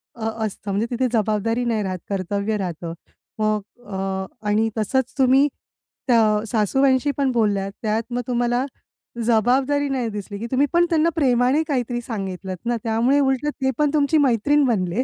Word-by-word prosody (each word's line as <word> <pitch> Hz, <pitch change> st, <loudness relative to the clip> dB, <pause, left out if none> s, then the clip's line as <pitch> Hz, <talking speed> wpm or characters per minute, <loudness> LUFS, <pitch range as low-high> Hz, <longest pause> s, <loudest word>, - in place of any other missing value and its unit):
अ, 225 Hz, -2 st, -5 dB, 0.2 s
असतं 205 Hz, -1 st, -5 dB
म्हणजे 205 Hz, +3 st, 0 dB
तिथे 250 Hz, +1 st, +1 dB
जबाबदारी 225 Hz, +2 st, 0 dB
नाही 225 Hz, -3 st, 0 dB
राहत, 185 Hz, -2 st, -3 dB
कर्तव्य 200 Hz, +2 st, -1 dB
राहतं. 175 Hz, -3 st, -4 dB, 0.5 s
मग 215 Hz, -1 st, +1 dB, 0.3 s
अ, 190 Hz, -1 st, -3 dB, 0.2 s
आणि 215 Hz, +2 st, +2 dB
तसंच 255 Hz, +4 st, 0 dB
तुम्ही, 265 Hz, +1 st, +5 dB, 0.6 s
त्या 235 Hz, -3 st, +5 dB, 0.3 s
सासूबाईंशी 260 Hz, +5 st, +2 dB
पण 275 Hz, -2 st, +1 dB
बोललात 205 Hz, -5 st, 0 dB
त्यात 220 Hz, 0 st, 0 dB
मग 245 Hz, -, 0 dB
तुम्हाला 245 Hz, +1 st, +1 dB, 0.6 s
जबाबदारी 260 Hz, +5 st, +2 dB
नाही 255 Hz, -4 st, -1 dB
दिसली? 205 Hz, -1 st, -6 dB
की 230 Hz, -, -4 dB
तुम्ही 270 Hz, +2 st, +3 dB
पण 345 Hz, 0 st, +5 dB
त्यांना 330 Hz, -1 st, +3 dB
प्रेमाने 260 Hz, 0 st, +3 dB
काहीतरी 245 Hz, -4 st, -1 dB
सांगितलंत 190 Hz, -5 st, -5 dB
ना? 240 Hz, 0 st, 0 dB
त्यामुळे 235 Hz, +5 st, +2 dB
उलटं 270 Hz, +1 st, +1 dB
ते 265 Hz, 0 st, +2 dB
पण 300 Hz, -1 st, +3 dB
तुमची 300 Hz, +1 st, +3 dB
मैत्रीण 285 Hz, +1 st, +3 dB
बनले 200 Hz, 0 st, 0 dB
235 Hz, 155 wpm, -22 LUFS, 210-265 Hz, 0.6 s, तुम्ही